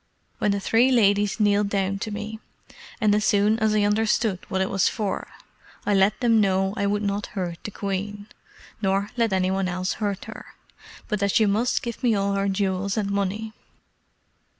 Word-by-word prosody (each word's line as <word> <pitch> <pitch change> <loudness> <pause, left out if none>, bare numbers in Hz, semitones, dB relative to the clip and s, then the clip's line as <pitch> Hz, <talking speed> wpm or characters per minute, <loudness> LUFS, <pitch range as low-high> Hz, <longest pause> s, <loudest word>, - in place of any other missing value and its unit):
When - - +1
the 200 0 +1
three 230 +6 +3
ladies 205 -3 +3
kneeled 205 -1 +3
down 195 -1 -1
to 215 - -4
me, 215 +1 -6 0.6
and 210 -1 +3
as 210 0 +2
soon 210 +2 +3
as 215 -1 +2
I 210 - +3
understood 210 -1 +1
what 190 - -1
it 190 - 0
was 195 -1 +2
for, 210 -4 -3 0.6
I 205 - +2
let 195 +3 +3
them 230 -3 +4
know 190 -1 +1
I 200 - 0
would 205 +1 0
not 200 0 -2
hurt 175 -3 -3
the - - -4
queen, 205 +1 -4 0.6
nor 195 +1 0
let 230 -3 +1
any 185 -1 +1
one 190 0 0
else 185 +1 -2
hurt 200 -2 -2
her, - - -11 0.5
but 210 - -1
that 200 -1 +1
she 220 - +4
must 215 +5 +1
give 235 -1 -5
me 235 -3 +2
all 200 0 0
her 195 0 0
jewels 195 +1 -1
and 200 -2 -1
money. 200 +2 -2
205 Hz, 190 wpm, -24 LUFS, 195-215 Hz, 0.6 s, them